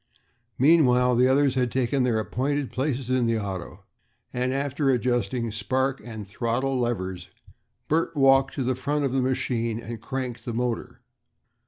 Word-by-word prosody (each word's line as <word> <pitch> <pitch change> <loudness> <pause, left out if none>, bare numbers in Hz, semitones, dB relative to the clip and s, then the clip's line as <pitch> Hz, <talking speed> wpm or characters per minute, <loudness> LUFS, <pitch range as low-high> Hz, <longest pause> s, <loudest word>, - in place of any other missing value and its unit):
Meanwhile 125 -4 +4
the 125 +2 +4
others 135 +1 +3
had 125 -2 0
taken 130 +1 +1
their 125 -3 +2
appointed 135 +5 -1
places 130 -2 -2
in 125 -2 +2
the 115 0 +1
auto, 95 -4 -6 0.5
and, 125 +1 0
after 140 +1 0
adjusting 120 -2 0
spark 130 +6 -1
and 110 -4 -8
throttle 120 +6 -1
levers, 95 -7 -3 0.6
Bert 165 +1 0
walked 135 -1 +4
to 135 - -1
the 130 +1 +1
front 145 +3 -1
of 135 - -1
the 135 0 +1
machine 125 -3 -1
and 115 -1 -7
cranked 130 -1 -4
the 120 - -4
motor. 120 0 -3
125 Hz, 155 wpm, -25 LUFS, 115-135 Hz, 0.6 s, Meanwhile